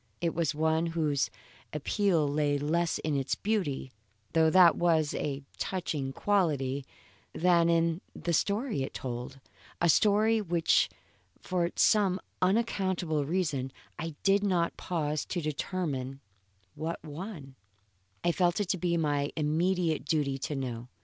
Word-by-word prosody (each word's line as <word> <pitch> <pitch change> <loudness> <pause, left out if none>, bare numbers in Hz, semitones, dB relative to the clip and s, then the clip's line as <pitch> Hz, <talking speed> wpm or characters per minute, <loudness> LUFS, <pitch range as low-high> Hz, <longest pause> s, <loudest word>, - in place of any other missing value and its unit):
It 170 -1 0
was 160 -3 0
one 160 +2 +1
whose 155 -4 0 0.4
appeal 160 +1 +1
lay 145 0 +1
less 165 +4 0
in 155 -2 -2
its 135 -1 0
beauty, 185 -12 -1 0.4
though 160 -1 +5
that 175 -1 +7
was 160 -3 +2
of - - -2
a 140 -1 -3 0.2
touching 155 -8 -2
quality, 140 -7 0 0.5
than 170 -1 +3
in 165 +1 +2
the 170 +1 -2
story 205 - 0
it 135 - -4
told, 125 +2 -5 0.4
a 170 - +3
story, 215 +5 +4
which 170 -4 +2 0.5
for 175 -2 0
some 195 -4 +3 0.2
unaccountable 185 -6 +1
reason 150 -6 -1 0.3
I 165 -1 -4
did 200 +1 +4
not 175 -4 +1
pause 155 -4 -2
to 180 - -3
determine 150 -4 -3 0.5
what 165 +2 -4
one 155 -2 -7 0.7
I 175 - +3
felt 175 +1 +1
it 205 -3 -1
to 190 - 0
be 170 0 +1
my 145 -3 0
immediate 165 +1 +1
duty 140 -3 0
to 145 +2 -3
know. 125 -3 -4
165 Hz, 135 wpm, -30 LUFS, 145-180 Hz, 0.7 s, that